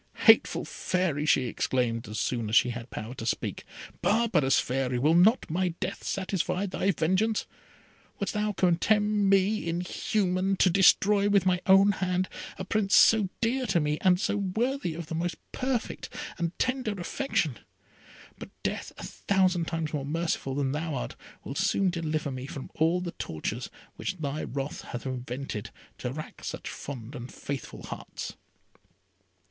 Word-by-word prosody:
"Hateful - - +6
Fairy!" 170 -5 -1
she 135 - +4
exclaimed, 115 -1 -1
as 105 +1 -4
soon 115 -4 -1
as 110 - 0
she 125 - +6
had 120 +1 -7
power 110 +3 -6
to 120 - -7
speak, - - -2 0.4
"Barbarous 210 - +3
Fairy! 130 -1 -1
will 150 +6 +3
not 200 +9 +5
my 175 +1 -1
death - - -4
satisfy 190 0 -1
thy 195 0 -1
vengeance? 195 +5 +1 0.7
Wouldst 200 - -2
thou 210 0 0
condemn 205 +3 +2
me, 195 0 +3
inhuman, 185 +2 0
to 185 -1 +4
destroy 200 +2 +5
with 200 -2 +4
my 180 -1 +2
own 195 +1 +7
hand 185 -1 -1 0.3
a 185 - -5
Prince 210 +2 +2
so 220 -5 +6
dear 250 +2 +1
to 185 -4 +3
me, 150 0 0
and 180 -1 +4
so 205 - 0
worthy 205 - -1
of 170 0 -5
the 155 - -7
most 170 +2 -1 0.2
perfect 255 -3 -2 0.3
and 170 0 -2
tender 255 -6 -1
affection? 200 - -1 0.8
But - - -8
death, - - -2
a - - -8
thousand 185 -3 +1
times 165 -2 -2
more 145 -2 -1
merciful 150 -2 -2
than 140 -2 0
thou 155 +2 -2
art, - - -4 0.3
will - - -5
soon 195 +2 +2
deliver 155 -4 -2
me 130 0 -5
from 135 -1 -7
all 165 +3 +2
the 175 -1 -4
tortures 80 - -4 0.3
which 185 - -3
thy 150 -1 -3
wrath 140 +2 -4
hath 120 +1 -7
invented, 125 -3 -4 0.3
to 125 - -3
rack 155 +3 -8
such - - -5
fond 125 -2 -7
and 125 -2 -7
faithful 140 -1 -6
hearts." - - -6
175 Hz, 160 wpm, -28 LUFS, 140-200 Hz, 0.8 s, own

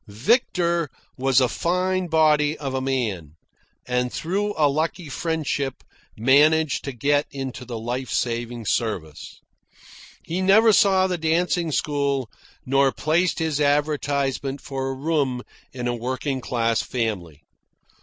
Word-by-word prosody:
Victor 170 - +1 0.3
was 130 0 +3
a 130 - +3
fine 180 +4 0
body 155 -2 +3
of 135 -3 -4
a 130 - -1
man, 110 - -2 0.5
and 125 0 -1
through 205 +5 -2
a 155 - +4
lucky 155 +3 -2
friendship 145 -3 -2 0.3
managed 145 +6 +4
to 140 - -3
get 145 +4 +1
into 135 -2 -6
the 120 -1 -5
life 120 +3 -4
saving 120 -1 -2
service. 95 -10 -3 0.8
He 175 +3 -3
never 215 +4 +5
saw 190 -2 +4
the 180 -2 -1
dancing 165 +1 +1
school 140 -4 -1 0.3
nor 135 +1 +3
placed 155 +9 +1
his 160 -3 -1
advertisement 140 -2 0
for 135 -1 -4
a 135 - -3
room 135 -4 -1 0.3
in 125 -2 -4
a 120 - 0
working 130 +3 -3
class 115 -1 0
family. 95 - -4
140 Hz, 130 wpm, -23 LUFS, 125-160 Hz, 0.8 s, never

